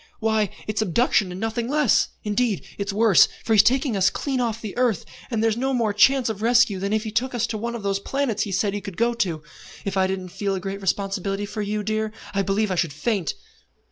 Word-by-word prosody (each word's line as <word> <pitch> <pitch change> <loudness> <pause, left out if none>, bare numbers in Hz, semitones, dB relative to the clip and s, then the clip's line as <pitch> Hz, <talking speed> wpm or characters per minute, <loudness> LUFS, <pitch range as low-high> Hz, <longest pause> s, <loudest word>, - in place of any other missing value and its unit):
Why, 220 -2 +1 0.2
it's 215 0 -1
abduction 210 0 +2
and 180 - -6
nothing 225 +2 -2
less. 295 -4 +3 0.2
Indeed 210 0 0
it's 200 0 -2
worse, 215 -1 +5 0.2
for 225 - +1
he's 210 - +8
taken 255 +2 +2
us 195 -1 +4
clean 270 -3 -2
off 225 -2 -1
the 215 -4 -7
earth, 240 -6 +1 0.2
and 225 -3 -1
there's 225 -1 +2
no 265 +3 -1
more 225 -4 +1
chance 260 +5 +4
of 215 -2 -3
rescue 230 -4 +3
than 200 +1 -2
if 215 0 +1
he 220 - -5
took 245 +3 -1
us 240 -1 +1
to 225 - -4
one 235 +2 -3
of 225 - -6
those 200 0 0
planets 260 0 -1
he 205 - -2
said 200 +1 0
he 205 - -3
could 195 -3 -8
go 235 +1 +2
to. 170 -9 -2 0.4
If 195 -1 -2
I 190 0 +3
didn't 190 -1 -4
feel 195 +2 -2
a - - -2
great 195 +1 -5
responsibility 195 +1 -1
for 210 +2 -5
you, 210 +1 -2
dear, 215 +1 -1 0.2
I 195 - +1
believe 200 +1 0
I - - 0
should 170 -4 0
faint." 190 - -1
215 Hz, 235 wpm, -23 LUFS, 195-235 Hz, 0.4 s, he's